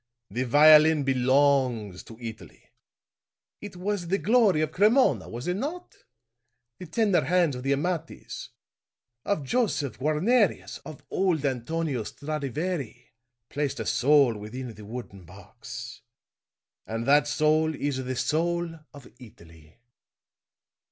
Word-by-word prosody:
The 125 +5 -2
violin 155 +3 +6
belongs 130 -6 +1
to 115 - -12
Italy. 115 -2 -10 0.9
It 205 -3 -9
was 185 0 -3
the 190 +3 +1
glory 205 -3 +3
of 155 -1 -1
Cremona, 205 - +3
was 120 +5 -7
it 180 +1 -1
not? 320 - -5 0.8
The 180 - -8
tender 200 - +2
hands 170 -1 +2
of 125 - -6
the 135 +2 +1
Amatis, 165 +3 -4 0.8
of 200 -8 -1
Josef 150 - -1
Guarnerius, 180 - +1
of 155 - -10
old 175 -6 0
Antonio 140 +1 -2
Stradivari, 145 - -5 0.4
placed 145 -1 -3
a - - -3
soul 140 -3 +3
within 115 +4 -7
the 105 -1 -12
wooden 105 -4 -8
box; 90 +3 -10 0.9
and 115 +1 -4
that 145 +2 +4
soul 155 +1 +2
is 140 -2 -2
the 130 0 -4
soul 165 +5 -1 0.2
of 140 -3 -12
Italy!" 85 - -17
145 Hz, 120 wpm, -26 LUFS, 125-170 Hz, 0.9 s, violin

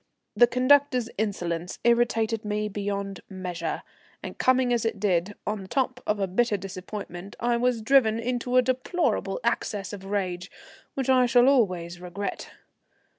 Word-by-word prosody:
The 240 - +7
conductor's 255 -1 +3
insolence 180 -5 -2
irritated 230 -2 +2
me 210 0 -1
beyond 200 -1 -3
measure, 185 -3 -4 0.4
and - - -6
coming 255 -1 +3
as 235 - +1
it 225 -3 -2
did 190 0 0
on 210 -1 -2
the 190 - -9
top 255 +2 -1
of 195 -3 -1
bitter 235 -3 +2
disappointment 195 0 -7
I 240 0 +1
was 240 -2 0
driven 225 -3 +4
into 245 +1 -1
a 255 - +6
deplorable 255 - 0
access 205 -3 -1
of 195 -2 -7
rage, 190 -2 -3 0.5
which 265 -2 -2
I 255 -1 +5
shall 245 0 +5
always 180 -10 +1
regret. 180 +3 -5
215 Hz, 145 wpm, -26 LUFS, 195-245 Hz, 0.5 s, The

